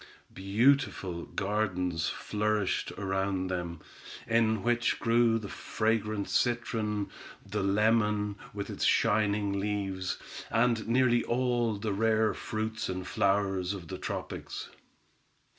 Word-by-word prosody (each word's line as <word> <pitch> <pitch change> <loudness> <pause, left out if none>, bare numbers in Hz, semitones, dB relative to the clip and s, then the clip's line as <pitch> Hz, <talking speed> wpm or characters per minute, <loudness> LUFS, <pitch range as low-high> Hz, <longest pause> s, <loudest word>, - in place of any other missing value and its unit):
Beautiful 95 -4 +1
gardens 90 -5 -1
flourished 105 -3 -1
around 95 -1 -1
them, 85 -3 -4 0.4
in 110 -2 +2
which 120 0 +1
grew 115 0 +3
the 110 -2 -5
fragrant 110 -1 -1
citron, 105 -1 0 0.3
the 105 +1 -2
lemon, 105 +1 +2 0.2
with 100 -1 -5
its - - -4
shining 105 -2 +2
leaves, 95 -3 -2 0.3
and 115 0 +2
nearly 120 0 +3
all 120 -2 +1
the 105 0 -2
rare 110 +1 +2
fruits 110 0 -3
and 95 0 -3
flowers 95 0 +1
of 85 -5 -9
the - - -5
tropics. - - -5
105 Hz, 110 wpm, -30 LUFS, 95-115 Hz, 0.4 s, grew